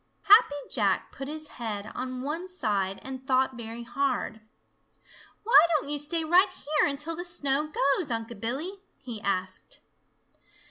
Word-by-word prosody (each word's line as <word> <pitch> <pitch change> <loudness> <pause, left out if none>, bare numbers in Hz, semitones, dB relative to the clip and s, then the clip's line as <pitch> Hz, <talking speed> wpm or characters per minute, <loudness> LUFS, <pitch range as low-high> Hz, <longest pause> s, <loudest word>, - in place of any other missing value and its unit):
Happy 410 -8 +7 0.2
Jack 200 -6 +1
put 270 0 -7
his 310 +1 -4
head 215 -3 -5
on 255 0 -5
one 325 +6 -3
side 205 - +1
and 260 0 -8
thought 260 -1 +2
very 230 0 -7
hard. 245 -2 -2 1.0
"Why 460 +3 +1 0.2
don't 285 - -6
you 295 - +1
stay 320 +3 0
right 360 +5 +4
here 300 -5 0
until 295 +4 -3
the 350 - -5
snow 300 -4 0
goes, 280 +3 +1
Unc' 225 -1 -4
Billy?" 305 - -3 0.2
he 235 -5 -6
asked. 185 -2 -1
270 Hz, 145 wpm, -27 LUFS, 230-310 Hz, 1.0 s, Happy